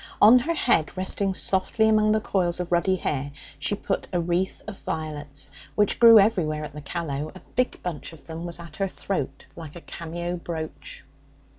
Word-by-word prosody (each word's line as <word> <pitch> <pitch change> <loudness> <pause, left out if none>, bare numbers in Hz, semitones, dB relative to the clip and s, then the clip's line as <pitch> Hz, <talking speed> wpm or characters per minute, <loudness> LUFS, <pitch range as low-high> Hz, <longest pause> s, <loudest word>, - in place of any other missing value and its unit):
On 240 +4 +8
her 330 +7 -1
head, 185 - +2
resting 190 +1 0
softly 195 +4 +2
among 215 -1 +4
the 215 - +3
coils 180 -4 0
of 180 -1 -4
ruddy 175 +2 +3
hair, 145 -5 -2 0.3
she 175 +8 0
put 195 -1 -3
a 175 - +1
wreath 175 +2 -1
of 215 -2 -8
violets, 145 -3 -5 0.3
which 210 -1 +2
grew 230 -1 +10
everywhere 175 -8 +3
at 150 -1 -7
the 150 - -7
Callow; 150 -1 -4
a - - -9 0.2
big 255 0 0
bunch 170 -4 -5
of 160 -4 -14
them 165 0 -7
was 170 -1 -4
at 170 -1 -11
her 195 - 0
throat 145 -8 -4
like 160 -2 -9
a 175 - -9
cameo 170 +2 -5
brooch. 170 - -6
175 Hz, 185 wpm, -25 LUFS, 155-200 Hz, 0.3 s, grew